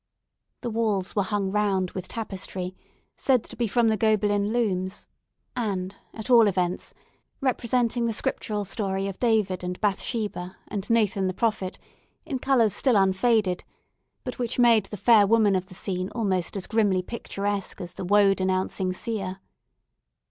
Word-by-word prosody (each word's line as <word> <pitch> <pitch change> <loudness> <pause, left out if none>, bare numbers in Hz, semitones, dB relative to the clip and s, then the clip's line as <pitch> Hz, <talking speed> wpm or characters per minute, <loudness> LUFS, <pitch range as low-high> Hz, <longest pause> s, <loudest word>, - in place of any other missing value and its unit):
The 240 - -3
walls 215 -4 0
were 205 - +3
hung 200 -1 -1
round 195 -3 +1
with 185 -1 -6
tapestry, 190 -4 -5 0.4
said 255 -4 +2
to - - -10
be 235 - 0
from 235 +2 +2
the 220 - +3
Gobelin 205 -1 +2
looms, 195 -5 -1 0.5
and, 195 -5 -2 0.2
at 220 0 -6
all 235 -4 +7
events, 180 -2 -1 0.4
representing 240 -2 +1
the - - 0
Scriptural 210 -1 -2
story 195 -1 -2
of 195 - -6
David 215 -7 +1
and 180 0 -4
Bathsheba, 205 -3 -2
and 205 +1 -4
Nathan 205 -4 +2
the 185 - -3
Prophet, 210 -5 -1 0.5
in 270 -5 -3
colours 245 -6 +3
still 260 -4 +3
unfaded, 195 0 +2 0.6
but 250 - -6
which 245 0 -2
made 230 -5 +5
the 210 - -7
fair 210 0 +5
woman 215 -2 +4
of 185 0 -1
the 185 - -13
scene 185 0 -3
almost 195 -5 -1
as 190 - -3
grimly 205 -4 +2
picturesque 200 -3 -3
as 175 -2 -6
the - - -6
woe 200 +1 +5
denouncing 185 0 -1
seer. 195 -3 -4
205 Hz, 155 wpm, -26 LUFS, 190-230 Hz, 0.6 s, all